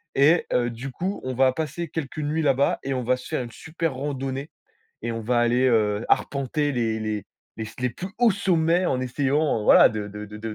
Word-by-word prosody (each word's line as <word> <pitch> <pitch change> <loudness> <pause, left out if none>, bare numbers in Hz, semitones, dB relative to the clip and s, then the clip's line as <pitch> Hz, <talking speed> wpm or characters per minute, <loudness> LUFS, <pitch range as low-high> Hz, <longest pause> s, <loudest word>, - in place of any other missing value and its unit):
et 150 +5 +4
heu, 120 -1 +2
du 120 +4 -7
coup, 185 +9 -3
on 130 - -3
va 130 +1 +3
passer 160 +3 -3
quelques 155 -2 -5
nuits 155 +2 -1
là-bas 140 -1 +2
et 135 - -2
on 125 -1 -2
va 130 +2 +2
se 125 - -12
faire - - -2
une 120 - -9
super 165 +1 -3
randonnée 135 +1 -4 0.5
et 120 - -2
on 115 - -4
va 120 +2 +1
aller, 120 +2 +3
heu, 110 -3 +2
arpenter 145 +2 0
les 115 -3 0
les 105 -2 -3 0.3
les 110 - -5
s 110 - -10
les 125 -1 0
plus 185 - -6
hauts 240 -1 +5
sommets 175 -2 +2
en 130 - 0
essayant, 135 +1 0
heu, - - -4
voilà, - - +8
de 105 -1 -4
de 105 +1 -7
de 105 - -10
de 110 0 -5
130 Hz, 230 wpm, -24 LUFS, 115-150 Hz, 0.5 s, voilà